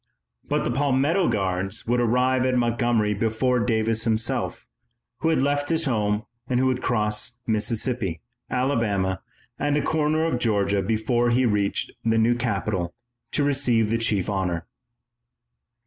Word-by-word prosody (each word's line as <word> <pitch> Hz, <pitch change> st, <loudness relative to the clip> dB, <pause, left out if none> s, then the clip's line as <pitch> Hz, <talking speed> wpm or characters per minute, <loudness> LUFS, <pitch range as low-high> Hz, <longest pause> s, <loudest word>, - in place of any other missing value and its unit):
But -, -, -1 dB
the -, -, -1 dB
Palmetto 145 Hz, +7 st, +2 dB
Guards 95 Hz, -1 st, -1 dB
would 120 Hz, +1 st, +1 dB
arrive 125 Hz, +2 st, +2 dB
at 130 Hz, -1 st, +1 dB
Montgomery 120 Hz, -3 st, +1 dB
before 115 Hz, +4 st, +1 dB
Davis 115 Hz, -1 st, +1 dB
himself, 115 Hz, 0 st, -1 dB, 0.5 s
who 160 Hz, -, +1 dB
had 160 Hz, -, +2 dB
left 145 Hz, +1 st, 0 dB
his 165 Hz, 0 st, +1 dB
home 105 Hz, -4 st, 0 dB, 0.2 s
and 125 Hz, -1 st, +1 dB
who 130 Hz, -, +2 dB
would 130 Hz, -1 st, 0 dB
cross 105 Hz, +1 st, 0 dB
Mississippi, 110 Hz, -4 st, -1 dB, 0.3 s
Alabama, 105 Hz, -8 st, 0 dB, 0.4 s
and 145 Hz, 0 st, +1 dB
a -, -, +1 dB
corner 155 Hz, +1 st, +1 dB
of 160 Hz, -7 st, 0 dB
Georgia 100 Hz, -4 st, +1 dB
before 115 Hz, +4 st, +1 dB
he 125 Hz, +2 st, +3 dB
reached 105 Hz, -3 st, 0 dB
the 115 Hz, 0 st, +2 dB
new 115 Hz, +2 st, +4 dB
capital 105 Hz, -7 st, -2 dB, 0.4 s
to 145 Hz, -, +1 dB
receive 125 Hz, -6 st, +2 dB
the 115 Hz, -, +1 dB
chief 105 Hz, -5 st, 0 dB
honor. 90 Hz, -4 st, -2 dB
115 Hz, 145 wpm, -24 LUFS, 105-130 Hz, 0.5 s, new